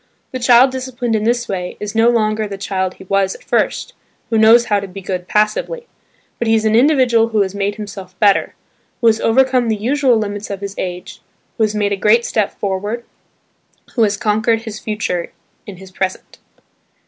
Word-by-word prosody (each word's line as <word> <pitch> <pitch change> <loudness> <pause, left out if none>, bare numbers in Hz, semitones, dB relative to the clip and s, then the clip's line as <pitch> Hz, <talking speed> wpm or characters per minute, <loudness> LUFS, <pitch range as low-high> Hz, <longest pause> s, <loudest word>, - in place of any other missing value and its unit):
The 255 - -4
child 245 +1 +5
disciplined 255 -3 -3
in 215 0 -1
this 240 0 0
way, 180 -2 -4
is 210 0 -5
no 225 +1 +4
longer 215 -2 +1
the 200 -1 -6
child 190 -1 -2
he - - -13
was 195 0 0
at - - -15
first, - - -1 0.4
who 225 - +2
knows 230 +2 +6
how 205 -3 +1
to 200 - -6
be 190 +1 -9
good 185 -2 -5
passively; 215 - 0 0.5
but 235 - -1
he 225 - +4
is 220 0 0
an 220 0 +3
individual 245 -3 +4
who 220 -2 +1
has 190 -1 -5
made 200 0 -2
himself 195 -3 -9
better, 205 -2 +3 0.4
who - - -3
has 225 -1 +4
overcome 255 0 +2
the 220 - +1
usual 255 +3 +2
limits 205 -1 -4
of 200 -1 -5
his 200 -1 -5
age, 180 -1 -6 0.4
who 225 - +2
has 215 0 -3
made 205 -1 0
a - - -2
great 225 +4 +3
step 210 -3 0
forward, 205 +4 -3 0.9
who 240 - 0
has 205 -2 +2
conquered 220 +2 +1
his 220 -2 -7
future 210 -5 -3 0.3
in 200 -3 -9
his 190 0 -13
present. 185 0 -4
215 Hz, 195 wpm, -17 LUFS, 200-235 Hz, 0.9 s, knows